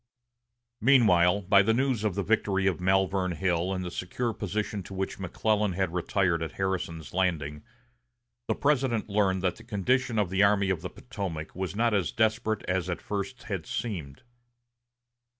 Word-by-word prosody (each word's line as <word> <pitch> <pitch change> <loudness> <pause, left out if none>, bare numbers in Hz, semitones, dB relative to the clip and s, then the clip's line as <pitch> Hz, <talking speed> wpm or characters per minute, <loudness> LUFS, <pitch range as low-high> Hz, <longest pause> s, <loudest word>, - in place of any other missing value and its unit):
Meanwhile, 105 -7 +5
by 100 +1 +5
the 110 +3 +2
news 130 -4 +1
of 105 -4 0
the 100 - -1
victory 100 -3 +1
of 95 -4 +1
Malvern 95 0 +2
Hill 90 +2 0
and 95 -1 -2
the 90 - -5
secure 115 +7 -3
position 105 +1 -3
to 95 +1 -9
which 95 +1 -3
McClellan 105 +2 0
had 95 -2 -1
retired 90 -1 +1
at 80 -2 -4
Harrison's 90 -5 -3
Landing, 80 -6 -1 0.9
the - - +1
President 130 -7 +1
learned 95 -2 +1
that 90 -2 0
the - - -13
condition 120 +4 0
of 100 -4 +1
the 95 +1 +2
Army 100 -1 +4
of 85 -4 -2
the 90 - -5
Potomac 95 -10 -6
was 95 +1 -4
not 115 +1 +2
as 100 -4 +1
desperate 110 -1 0
as 90 -1 -1
at 90 - -2
first 100 -2 -4
had - - -4
seemed. 80 - -4
95 Hz, 170 wpm, -28 LUFS, 90-105 Hz, 0.9 s, Meanwhile